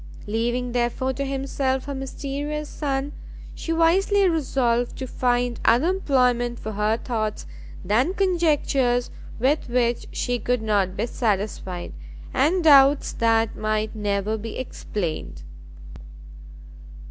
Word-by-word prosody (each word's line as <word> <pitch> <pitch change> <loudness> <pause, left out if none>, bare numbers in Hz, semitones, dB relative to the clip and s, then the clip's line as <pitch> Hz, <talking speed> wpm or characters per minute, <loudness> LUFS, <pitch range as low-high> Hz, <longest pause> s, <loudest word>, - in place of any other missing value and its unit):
Leaving 240 +3 -1
therefore 245 +2 0
to 275 - -3
himself 270 -1 -1
her 285 - -4
mysterious 280 +3 -4
son, 280 -1 -2 0.4
she 330 - -5
wisely 375 +5 +3
resolved 255 -7 0
to 260 - -4
find 245 -1 0
other 250 +9 +4
employment 250 -9 +1
for 220 - -6
her 210 +2 +1
thoughts, 220 - -3 0.4
than 230 - +2
conjectures 295 -10 +1 0.3
with 265 +4 +1
which 240 -1 0
she 245 0 -1
could 245 +1 -1
not 200 -3 +1
be 220 - 0
satisfied, 200 -6 -2 0.4
and 330 +7 +2
doubts 280 -2 +6
that 225 -1 +2
might 215 0 -1
never 205 +1 -1
be 225 +1 -6
explained. 180 - -5
245 Hz, 115 wpm, -24 LUFS, 220-280 Hz, 0.4 s, doubts